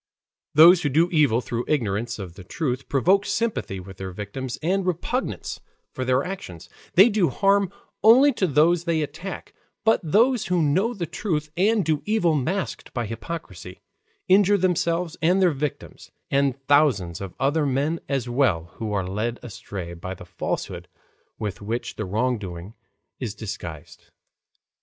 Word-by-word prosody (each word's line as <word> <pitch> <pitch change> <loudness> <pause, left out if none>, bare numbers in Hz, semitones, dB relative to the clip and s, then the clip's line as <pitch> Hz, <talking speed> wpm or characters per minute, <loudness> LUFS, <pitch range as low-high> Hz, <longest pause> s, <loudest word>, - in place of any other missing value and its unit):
Those 170 +3 +8
who 145 - 0
do 165 +6 +2
evil 145 -8 +3
through 120 0 -3
ignorance 115 -4 -1
of 95 -5 -7
the 95 +1 -12
truth 130 - -3
provoke 185 +9 +3
sympathy 215 - -2
with 95 +1 -11
their 95 -1 -5
victims 105 +7 -6
and 190 +4 +1
repugnance 185 +8 -2 0.3
for 130 - -3
their 130 +1 +2
actions, 90 - -7 0.3
they 195 +5 +8
do 205 -6 +2
harm 195 -1 +2 0.3
only 260 +6 +7
to 195 -5 0
those 165 +3 +3
they 165 -3 +1
attack; 160 +6 -7 0.3
but 225 - +4
those 230 - +3
who 180 -1 +1
know 190 +12 +1
the 180 -4 -3
truth 155 -3 -3
and 205 +2 +2
do 155 -2 +1
evil 210 -7 +2
masked 160 +7 -2
by 120 -2 -1
hypocrisy, 110 - -7 0.4
injure 200 +2 +5
themselves 170 -2 0
and 180 +4 +3
their 185 -2 +4
victims, 145 0 -5 0.2
and 140 -1 +1
thousands 125 - +2
of 95 -3 -7
other 145 +3 +1
men 145 +5 0
as 135 -3 -1
well 120 - +1
who 110 -2 -4
are 95 -2 0
led 110 +6 -2
astray 95 -5 -7
by 95 +2 -6
the 90 - -12
falsehood 90 0 -4 0.5
with 105 -2 -5
which 115 +4 -4
the 110 - -4
wrongdoing 100 -3 -2 0.5
is 115 -6 -4
disguised. 85 -8 -8
145 Hz, 155 wpm, -24 LUFS, 105-180 Hz, 0.5 s, Those